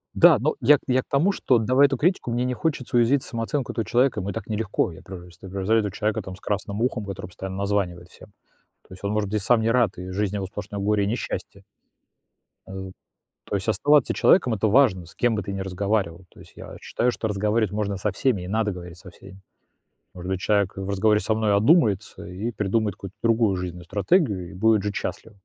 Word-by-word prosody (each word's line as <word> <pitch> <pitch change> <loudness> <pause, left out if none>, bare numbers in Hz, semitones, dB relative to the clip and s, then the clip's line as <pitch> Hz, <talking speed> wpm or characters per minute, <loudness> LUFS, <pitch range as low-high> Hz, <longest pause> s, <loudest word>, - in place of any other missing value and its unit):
Да, - - +7
но 455 - 0
я 150 - +6
я 130 0 +2
к - - -23
тому, 160 +9 +3
что, 130 -9 +2
давая 130 +5 +4
эту 135 -2 -2
критику, 170 -6 0
мне 120 +1 0
не 125 - -1
хочется 130 -3 -2
уязвить 130 +4 +3
самооценку 115 +3 -3
этого 115 - -3
человека, 125 +2 +2
ему 95 +2 -4
и - - -3
так 115 -3 -6
нелегко. 105 -4 -1
Я - - -12
просто 90 0 -11
превзойду 105 +2 +1
человека 110 +1 -1
там 95 -1 -8
с - - -16
красным 100 +1 -3
ухом, 120 -4 -1
который 100 -2 -6
постоянно 95 +1 -7
названивает 95 -4 -2
всем. - - -16 0.6
То - - -13
есть 95 - -14
он, 100 - -1
может 105 -2 -1
быть, 105 -1 -1
и - - -3
сам 120 -2 +3
не 115 - +1
рад, 115 -4 +2
и 90 +1 -7
жизнь 100 +1 -1
его 95 -1 -2
сплошное 105 +1 -7
горе 105 0 +1
и - - 0
несчастье. 115 +4 -4 1.0
Э, 95 0 -7 0.5
то - - -3
есть 100 +2 -3
оставаться 145 +5 +3
человеком- 130 -11 +4
это 110 +1 +1
важно, 105 -7 +3
с - - -15
кем 120 -2 +1
бы 105 - -2
ты 100 - -5
не 95 0 -4
разговаривал. 95 -2 -2
То - - -20
есть - - -15
я - - -10
считаю, 125 +1 0
что 110 - -3
разговаривать 105 0 0
можно 100 -2 -2
со 100 +1 -1
всеми 100 -2 0
и - - -7
надо 105 +1 0
говорить 90 -1 -9
со 90 - -12
всеми. 95 +2 -15 0.7
Может 90 +1 -6
быть, 95 -1 -1
человек, 100 -3 +1
э, - - -3
в 95 - -5
разговоре 105 +2 +2
со 110 - 0
мной 110 -2 +1
одумается 105 - +2
и 100 +5 -4
придумает 105 -1 0
какую-то 95 0 -10
другую 115 -4 +2
жизненную 90 -1 -6
стратегию 100 - +1
и - - -11
будет 110 +1 +3
жить 105 -1 -3
счастливо. 115 - -5
105 Hz, 225 wpm, -24 LUFS, 95-115 Hz, 1.0 s, Да